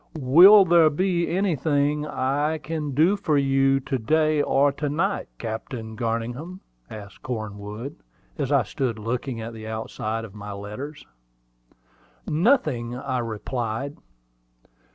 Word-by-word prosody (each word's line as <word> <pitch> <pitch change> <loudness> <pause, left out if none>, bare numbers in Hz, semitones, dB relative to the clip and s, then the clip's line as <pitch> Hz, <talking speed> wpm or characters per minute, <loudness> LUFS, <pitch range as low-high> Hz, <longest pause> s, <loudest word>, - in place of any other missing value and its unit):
"Will 180 +10 +8
there 170 -2 +5
be 175 +2 0
anything 150 -5 0
I 145 +3 0
can 150 -3 -4
do 165 +8 +4
for 160 -7 0
you 135 0 +3
to 130 0 -2
day 155 +4 +2
or 140 0 +3
to 145 +1 -3
night, 185 +8 -1
Captain 110 0 -6
Garningham?" 120 +10 -3 0.3
asked 100 -2 -10
Cornwood, 110 +2 -6 0.4
as 140 -1 -3
I 140 -3 +4
stood 120 +2 -3
looking 115 +2 -3
at 115 +1 -6
the 110 -1 -8
outside 110 0 -4
of 100 - -13
my 105 -1 -7
letters. 105 +10 -8 1.2
"Nothing," 150 - +1
I 130 0 -3
replied. 115 +3 -4
135 Hz, 125 wpm, -24 LUFS, 115-155 Hz, 1.2 s, Will